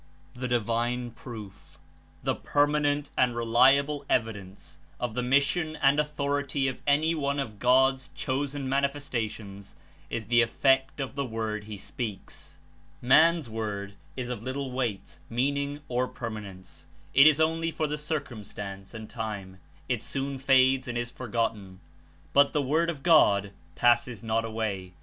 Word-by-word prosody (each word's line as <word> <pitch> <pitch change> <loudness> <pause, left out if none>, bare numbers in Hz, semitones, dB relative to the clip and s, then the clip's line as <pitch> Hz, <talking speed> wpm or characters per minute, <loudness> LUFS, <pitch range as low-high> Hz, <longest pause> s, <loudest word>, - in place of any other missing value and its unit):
The 125 +1 -4
divine 120 +1 0
proof, 110 -5 -11 0.5
the - - +1
permanent 145 0 +1
and 125 -2 +2
reliable 135 +5 +3
evi 115 -2 +2
dence 95 -1 -12 0.2
of 120 -3 -2
the 125 - -1
mission 140 +5 +1
and 140 0 +3
authority 145 -2 -1
of 130 - -4
any 155 +3 +3
one 140 -3 -1
of 110 -7 -4
God's 130 +3 +3
Chosen 140 +1 -2
Manifestations 120 -8 -3 0.3
is 110 - -3
the 120 +3 +4
effect 135 +4 +2
of 135 -2 -3
the 140 0 -2
Word 110 -3 -3
he 105 -1 -7
speaks. 105 0 -7 0.4
Man's 160 +4 +5
word 105 -3 -4 0.2
Is 125 -1 -3
of 125 -4 -4
little 130 +2 -4
weight, 120 -6 -3
meaning 140 +4 -1
or 125 +1 0
permanence; 105 -7 -8 0.3
It 140 +3 +8
Is 155 -1 +5
only 165 +1 +1
for 160 -1 -2
the 150 0 -3
circum 145 -8 -3
stance 100 +1 -8
and 110 -1 -7
time; 105 -5 -6 0.3
It 125 -4 -1
soon 135 +1 -3
fades 130 0 +4
and 120 -1 -3
is 120 0 -3
forgotten, 110 -6 -3 0.5
but 140 0 +5
the 150 - +2
Word 160 +5 +1
of 145 -5 -5
God 100 - +5 0.2
passes 120 -1 +2
not 115 0 0
away. 105 -5 -3
125 Hz, 145 wpm, -28 LUFS, 110-140 Hz, 0.5 s, It